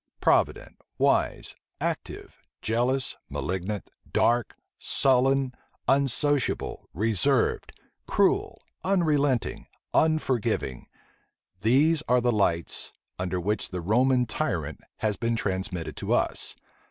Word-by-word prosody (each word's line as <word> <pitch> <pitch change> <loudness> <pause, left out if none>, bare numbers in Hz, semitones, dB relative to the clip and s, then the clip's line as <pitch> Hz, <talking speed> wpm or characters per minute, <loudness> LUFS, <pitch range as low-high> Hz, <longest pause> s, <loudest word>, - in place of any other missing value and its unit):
Provident, - - +1 0.2
wise, - - +1 0.2
active, - - -4 0.2
jealous, 125 +4 0
malignant, 95 +2 -3 0.2
dark, 120 -1 +2 0.2
sullen, 135 0 +3 0.3
unsociable, 140 +1 +1
reserved, 115 - +1 0.4
cruel, - - +2 0.2
unrelenting, 150 -9 +1 0.3
unforgiving 130 - +1 0.7
these 145 +9 +4
are 125 +1 +4
the 120 0 +2
lights 85 -6 0 0.3
under 90 0 -1
which 105 +5 -1
the 90 -2 -4
Roman 125 +7 +3
tyrant 85 - -2 0.2
has 105 -2 -1
been 115 0 0
transmitted 95 -5 -3
to - - -1
us. - - 0
120 Hz, 90 wpm, -27 LUFS, 100-135 Hz, 0.7 s, these